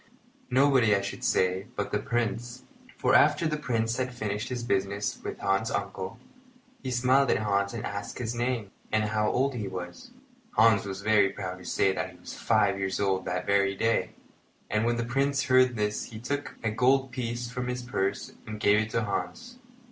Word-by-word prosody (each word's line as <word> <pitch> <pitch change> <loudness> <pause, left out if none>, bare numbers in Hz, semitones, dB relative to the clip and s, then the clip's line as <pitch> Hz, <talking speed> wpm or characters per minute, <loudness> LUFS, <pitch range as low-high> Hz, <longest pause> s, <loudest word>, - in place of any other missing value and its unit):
Nobody, 130 -5 +4
I 100 - +1
should - - -6
say, 95 +1 +1
but - - -3
the - - +1
Prince; 120 +1 -2 0.3
for - - +2
after 150 +2 +5
the 155 -1 +1
Prince 115 -5 -1
had 130 0 -1
finished 105 -2 -3
his 125 -2 -3
business 100 -1 -1
with - - -5
Hans's 100 +4 0
uncle, 100 +1 -4 0.6
he 130 - -4
smiled 130 +2 +3
at - - +3
Hans 100 -2 0
and 115 - -4
asked 100 0 -5
his 120 -2 -3
name 120 -4 -2 0.2
and 110 0 +2
how 105 0 +1
old 135 +2 +1
he 110 -5 -4
was. 90 - -7 0.4
Hans 110 -2 +5
was 95 0 -5
very 105 -2 +4
proud 95 -2 -6
to 90 - -13
say 95 +2 +2
that 90 0 -3
he - - -17
was - - -9
five 100 -1 +2
years 95 -1 -1
old 95 -2 0
that 90 0 -2
very 100 0 +2
day; 95 -3 0 0.6
and 110 +1 +1
when 120 0 +1
the 115 - -1
Prince 140 +3 +1
heard 130 -2 +4
this 105 -1 -1
he 110 - -9
took 140 +5 -4
a 110 - 0
gold 130 +3 +2
piece 120 -1 -4
from 125 0 -3
his 125 0 -3
purse 100 -5 -2
and 110 0 -6
gave 105 0 +4
it 110 0 -1
to 115 0 0
Hans. 240 - -4
110 Hz, 195 wpm, -28 LUFS, 100-125 Hz, 0.6 s, after